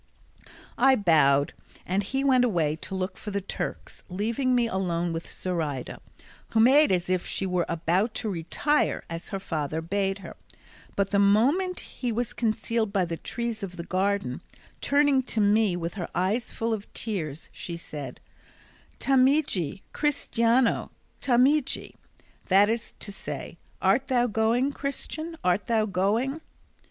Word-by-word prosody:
I 265 +1 +6
bowed, 150 - +4 0.3
and 190 +3 +1
he 265 +7 -2
went 260 -2 +4
away 165 -10 +1
to 190 - -6
look 185 0 -3
for - - -7
the 200 0 -1
Turks, 195 - -6
leaving 230 +7 0
me 240 -1 +3
alone 175 -5 -1
with 165 +1 -5
Zoraida, 155 -8 -3 0.5
who 225 - +1
made 265 +3 +6
as 180 -1 +1
if 185 -1 +1
she 195 - -3
were 180 -2 0
about 175 +7 0
to 220 -3 -2
retire 190 - 0
as 165 0 -5
her 195 - -3
father 155 -4 -3
bade 195 +3 -1
her; - - -9 0.6
but 200 -1 0
the 200 - +3
moment 270 - +3
he 245 -2 -4
was 235 +1 -2
concealed 225 -1 0
by 195 -3 +2
the 170 -1 -3
trees 235 +5 -4
of 180 -2 -6
the 170 - -4
garden, 190 -6 -1 0.4
turning 285 -1 +3
to 245 -3 -3
me 205 -2 +3
with 170 -1 -3
her 180 -5 -5
eyes 200 +6 0
full 230 0 -1
of 210 -2 -5
tears 165 -9 -4
she 170 -1 -5
said, 145 -6 -8 0.8
"Tameji, 260 - +2
cristiano, 245 -4 +1 0.3
tameji?" 265 +3 +2 0.5
that 200 +2 +5
is 230 -1 -4
to 205 - -6
say, 195 - -7 0.2
"Art - - +3
thou 245 -2 +3
going, 235 +4 +1
Christian, 310 +4 -4
art 180 +2 +1
thou 225 -2 +2
going?" 220 - 0
205 Hz, 150 wpm, -27 LUFS, 180-245 Hz, 0.8 s, I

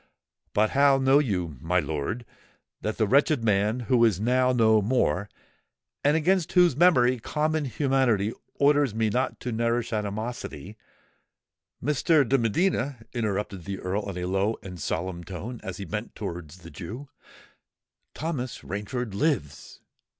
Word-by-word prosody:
"But 105 +1 +2
how 140 0 +5
know 135 +1 +4
you, 90 - -2
my 90 +3 +1
lord, 80 +10 -3 0.6
that 110 - -3
the 110 - +2
wretched 140 +2 +3
man, 105 +3 +1
who 120 0 +3
is 110 -6 +3
now 125 +3 +2
no 110 -3 +4
more, 100 - +1 0.7
and 145 +2 +4
against 180 +1 +1
whose 175 -6 +5
memory 130 -7 +4
common 155 +4 -1
humanity 120 -4 +1 0.2
orders 145 -5 +3
me 110 -1 +1
not 125 +4 -1
to 125 - -3
nourish 115 +1 0
animosity——" 110 0 -4 1.1
"Mr. 150 +1 +3
de 135 +2 +3
Medina," 130 - 0
interrupted 105 -5 -2
the 100 0 -4
Earl 100 +3 -3
in 95 - -5
a 90 - -3
low 95 +4 0
and 90 -2 -8
solemn 85 +3 -3
tone, 100 +7 -7
as 90 -2 -6
he 100 - -6
bent 105 +6 -5
towards 85 -4 -7
the 85 - -10
Jew, 115 +10 -8 1.1
"Thomas 140 -6 -4
Rainford 105 +3 -4
lives!" 120 - -2
115 Hz, 145 wpm, -26 LUFS, 100-135 Hz, 1.1 s, how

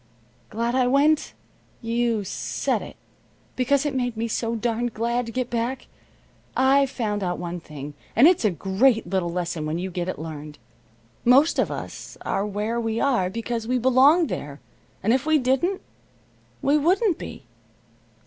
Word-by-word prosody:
Glad 235 +2 -1
I 255 -1 +3
went? 290 +4 +3 0.5
You 230 -2 0
said 190 - -2
it. - - -9 0.6
Because 275 +3 +2
it 295 - -1
made 245 -3 -2
me 230 +1 -1
so 230 +1 -1
darned 235 +1 -1
glad 235 +2 -1
to - - -5
get 250 +1 -3
back. 240 +2 -2 0.7
I've 270 +1 +4
found 210 -5 -2
out 180 -2 -1
one 175 0 -5
thing, 150 -2 -9 0.2
and 250 +7 +7
it's 355 -6 +3
a 215 - +4
great 195 - +2
little 185 -1 -1
lesson 170 -2 -3
when 155 +2 -2
you 185 +2 -4
get 175 0 -3
it - - -4
learned. 150 -2 -7 0.7
Most 270 +7 +5
of - - +2
us - - -7
are 200 +2 -1
where 210 +3 -2
we 225 0 -1
are 240 -10 +2
because 230 +2 -4
we 250 +1 +1
belong 260 +7 +5
there, 145 - -5 0.4
and 225 - +3
if 265 +3 0
we 315 0 +5
didn't, 275 +9 +1 0.8
we 290 +2 +4
wouldn't 370 +4 +2
be. - - -8
235 Hz, 165 wpm, -24 LUFS, 195-265 Hz, 0.8 s, and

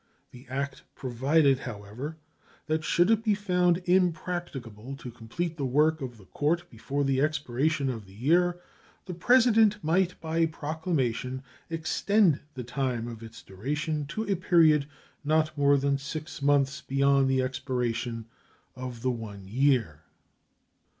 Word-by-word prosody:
The 125 +1 -14
act 135 +1 -3
provided, 135 +2 +2
however, 120 +6 -7 0.5
that 155 -1 -1
should 175 +6 +3
it 225 0 +2
be 215 -2 +2
found 180 -3 +1
impracticable 170 - -1
to 125 -2 -9
complete 155 +9 -4
the 140 - -2
work 155 +4 +2
of 125 -3 -6
the 100 - -16
court 170 - -1
before 140 +1 -2
the 135 -1 +1
expiration 145 0 0
of 115 -6 -4
the 95 - -16
year 175 - +2 0.5
the 180 - -5
President 225 +1 +4
might 180 +3 +1
by 165 0 +1
proclamation 145 -6 -2 0.3
extend 165 +1 +2 0.2
the 125 - -5
time 120 -2 -2
of 115 -2 -8
its 115 0 -11
duration 145 +9 -3
to 190 +9 -3
a 200 -2 0
period 160 -5 +4 0.4
not 155 0 +1
more 140 -1 +4
than 140 0 +1
six 155 +1 -6
months 140 -1 +2
beyond 135 0 +2
the 130 -1 +2
expiration 120 -3 -2 0.5
of 125 -2 -7
the 130 - +2
one 105 -5 -7
year. 115 - +1
140 Hz, 140 wpm, -28 LUFS, 125-165 Hz, 0.5 s, President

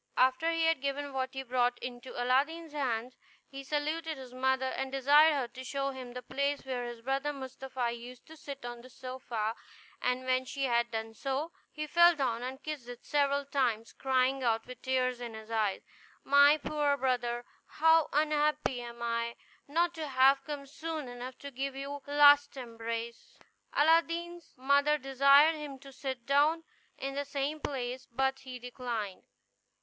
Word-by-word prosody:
After 260 +6 +3
he 330 0 +1
had 325 -4 +2
given 280 0 -3
what 260 -1 -1
he 265 - -3
brought 245 -1 +1
into 245 0 -7
Aladdin's 290 +6 +1
hands, 250 -4 -2 0.3
he 275 0 -8
saluted 305 +3 -2
his 255 -2 -10
mother, 265 +1 +1
and 265 0 -3
desired 290 +4 +6
her 265 -4 -1
to 260 +2 -9
show 275 +2 -2
him 255 -2 -8
the 250 0 -7
place 280 +3 -1
where 250 -2 -3
his 240 -1 -8
brother 270 +3 0
Mustapha 260 -2 -4
used 240 +1 -9
to 320 - -13
sit 280 -4 -8
on 240 -1 -6
the 255 - -14
sofa; 240 -4 -4 0.5
and 250 +1 0
when 255 0 +2
she 275 +2 -4
had 235 -2 +2
done 225 -1 -4
so, 275 +7 -3 0.2
he 305 0 -4
fell 345 +3 +6
down 245 -5 -1
and 260 +2 -6
kissed 300 -6 -5
it 245 -1 -10
several 280 -1 +1
times, 245 -5 0
crying 265 0 +1
out, 225 -2 +1
with 250 0 -10
tears 255 -1 0
in 235 -2 -6
his 220 +1 -10
eyes, 215 -3 0 0.4
"My 285 +2 +6
poor 295 -1 0
brother! 245 -2 -1 0.2
how 320 0 +4
unhappy 300 -3 +1
am 235 0 -8
I, 235 0 -1 0.3
not 335 +4 +1
to 315 -2 -5
have 270 +1 +4
come 290 -2 -5
soon 310 0 -5
enough 245 +1 -7
to 280 - -8
give 270 +1 -3
you 275 +1 -5
one 285 0 -6 0.2
last 290 -1 +7
embrace!" 230 -1 -6 0.3
Aladdin's 335 +2 +1
mother 280 +3 +3
desired 275 +3 +5
him 290 -3 -7
to 275 +1 -13
sit 260 -2 -5
down 295 +5 +3 0.3
in 275 0 -4
the 285 +1 -2
same 280 +2 -3
place, 255 -3 -4
but 265 +2 0
he 260 -1 -8
declined. 240 -5 -5
265 Hz, 175 wpm, -31 LUFS, 245-290 Hz, 0.5 s, last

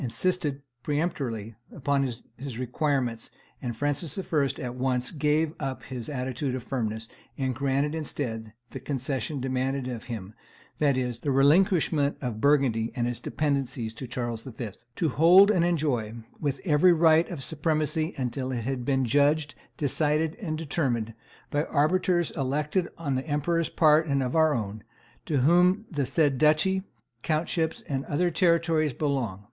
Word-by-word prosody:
insisted 145 +1 -1 0.2
peremptorily 135 - -2 0.2
upon 140 -1 +1 0.3
his 130 -1 -7
requirements; 125 -2 -1 0.3
and 120 -3 -4
Francis 145 - +1
I. 160 -8 0
at 125 -1 -4
once 125 -1 -1
gave 155 0 +1
up 135 -2 -4
his 125 -2 -6
attitude 130 -1 -2
of 130 - -5
firmness, 110 -4 -3 0.3
and 130 -2 -1
granted, 140 +3 0
instead, 120 -8 -4 0.2
the 135 - -6
concession 135 +1 -3
demanded 130 0 -1
of 120 -3 -5
him, 110 -4 -6 0.5
that 140 -3 +3
is, 125 -2 -1
the 145 - -3
relinquishment 150 +1 +3
of 120 -5 -4
Burgundy 135 -6 +2
and 120 -2 0
its 120 -2 -3
dependencies 130 -5 -2
to 125 +3 -7
Charles 120 -2 -3
V., 120 -2 -6 0.3
"to 165 - +1
hold 180 +9 +7
and 180 -5 +2
enjoy 140 -10 0 0.2
with 140 -3 -2
every 175 +2 +5
right 160 0 +4
of 160 -7 -4
supremacy 155 +2 -1
until 130 0 -2
it 120 -2 -2
hath 130 0 -2
been 135 0 +1
judged, 145 +4 +2 0.2
decided, 150 +2 +1
and 155 -6 -3
determined, 130 -8 -1 0.4
by 145 +2 +1
arbiters 175 +3 +2
elected 150 +6 -1
on 150 -5 -2
the 130 +3 -2
emperor's 160 +3 0
part 155 0 +4
and 140 -2 +1
our 155 +4 +3
own, 105 -2 -4 0.4
to 145 -5 +1
whom 180 - +4
the 145 -5 -1
said 140 -2 +2
duchy, 155 +5 +3 0.4
countships, 160 +1 -1
and 135 -1 -2
other 175 +4 0
territories 165 -4 +2
belong.... 130 -9 -1
140 Hz, 150 wpm, -27 LUFS, 125-155 Hz, 0.5 s, hold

